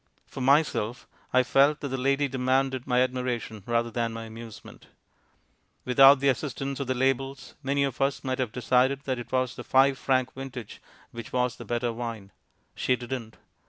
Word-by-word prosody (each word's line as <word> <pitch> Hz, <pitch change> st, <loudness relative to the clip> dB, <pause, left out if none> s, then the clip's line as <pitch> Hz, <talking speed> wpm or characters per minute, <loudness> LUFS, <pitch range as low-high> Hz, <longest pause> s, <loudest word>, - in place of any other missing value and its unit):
For 135 Hz, -, -8 dB
myself, 130 Hz, -4 st, +1 dB, 0.2 s
I 130 Hz, 0 st, +4 dB
felt 140 Hz, +4 st, +3 dB
that 140 Hz, -, -3 dB
the 135 Hz, -, -2 dB
lady 140 Hz, +2 st, +1 dB
demanded 130 Hz, 0 st, 0 dB
my 125 Hz, -1 st, +3 dB
admiration 125 Hz, -4 st, -3 dB
rather 120 Hz, 0 st, 0 dB
than 115 Hz, 0 st, -2 dB
my 115 Hz, 0 st, -6 dB
amusement. 115 Hz, -1 st, -11 dB, 1.0 s
Without 135 Hz, +2 st, +7 dB
the 140 Hz, -, +2 dB
assistance 135 Hz, +1 st, -1 dB
of 140 Hz, -, -3 dB
the 130 Hz, -, 0 dB
labels, 135 Hz, +1 st, -1 dB
many 140 Hz, 0 st, 0 dB
of 135 Hz, -3 st, -3 dB
us 135 Hz, +1 st, 0 dB
might 130 Hz, -1 st, -2 dB
have 125 Hz, -4 st, -1 dB
decided 130 Hz, +3 st, +2 dB
that 130 Hz, -2 st, -2 dB
it 120 Hz, -, -9 dB
was 130 Hz, -1 st, 0 dB
the -, -, -7 dB
five 135 Hz, 0 st, +3 dB
franc 130 Hz, -1 st, +1 dB
vintage 130 Hz, -4 st, -8 dB, 0.3 s
which 115 Hz, -2 st, -8 dB
was 125 Hz, -1 st, 0 dB
the -, -, -9 dB
better 120 Hz, 0 st, -1 dB
wine. 115 Hz, -4 st, -6 dB, 0.4 s
She 125 Hz, -, +1 dB
didn't. 120 Hz, -3 st, -6 dB
130 Hz, 175 wpm, -27 LUFS, 120-135 Hz, 1.0 s, Without